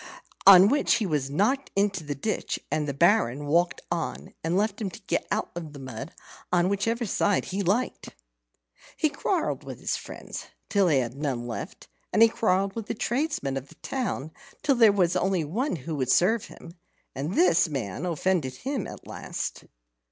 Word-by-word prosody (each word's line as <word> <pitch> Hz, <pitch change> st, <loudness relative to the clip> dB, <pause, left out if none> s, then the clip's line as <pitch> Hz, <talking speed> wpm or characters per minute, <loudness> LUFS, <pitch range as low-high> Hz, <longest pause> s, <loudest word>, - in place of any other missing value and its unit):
On 190 Hz, -1 st, +10 dB
which 285 Hz, +6 st, +3 dB
he 220 Hz, -, 0 dB
was 150 Hz, -6 st, -1 dB
knocked 220 Hz, -, +1 dB
into 195 Hz, -3 st, +1 dB
the 145 Hz, -1 st, -4 dB
ditch; 215 Hz, +11 st, -2 dB
and 150 Hz, -1 st, 0 dB
the -, -, 0 dB
Baron 145 Hz, -, +3 dB
walked 170 Hz, +4 st, +2 dB
on, 170 Hz, -2 st, -3 dB
and 165 Hz, +3 st, +1 dB
left 210 Hz, +1 st, 0 dB
him 200 Hz, -, -1 dB
to -, -, -11 dB
get -, -, -1 dB
out -, -, -1 dB
of 160 Hz, -4 st, -6 dB
the 140 Hz, -, -9 dB
mud 130 Hz, -1 st, -7 dB, 0.4 s
on 180 Hz, 0 st, +3 dB
whichever 225 Hz, +4 st, 0 dB
side 205 Hz, -1 st, +1 dB
he 195 Hz, +2 st, -2 dB
liked. 205 Hz, +7 st, -1 dB, 0.8 s
He -, -, +2 dB
quarrelled -, -, -1 dB
with -, -, -8 dB
his -, -, -1 dB
friends -, -, -8 dB, 0.2 s
till 200 Hz, -2 st, +3 dB
he 150 Hz, -5 st, +4 dB
had 120 Hz, -2 st, -1 dB
none 135 Hz, -5 st, -2 dB
left, 120 Hz, -1 st, -6 dB, 0.2 s
and 220 Hz, -, +6 dB
he 230 Hz, -, +7 dB
quarrelled 195 Hz, -3 st, +1 dB
with 225 Hz, -3 st, -5 dB
the -, -, -3 dB
tradesmen 240 Hz, -, -1 dB
of 135 Hz, +1 st, -6 dB
the -, -, -17 dB
town 205 Hz, -, -3 dB, 0.3 s
till 280 Hz, -, +4 dB
there 230 Hz, -4 st, +6 dB
was 185 Hz, -3 st, +2 dB
only 190 Hz, -3 st, +1 dB
one 220 Hz, -, -1 dB
who 160 Hz, +2 st, -6 dB
would 130 Hz, -2 st, -1 dB
serve 200 Hz, -, +3 dB
him, 170 Hz, -, -12 dB, 0.4 s
and 145 Hz, +7 st, -3 dB
this 330 Hz, -, +4 dB
man 130 Hz, -, -4 dB
offended 165 Hz, -5 st, 0 dB
him 260 Hz, -, -3 dB
at -, -, -10 dB
last. -, -, -5 dB
185 Hz, 185 wpm, -27 LUFS, 145-215 Hz, 0.8 s, On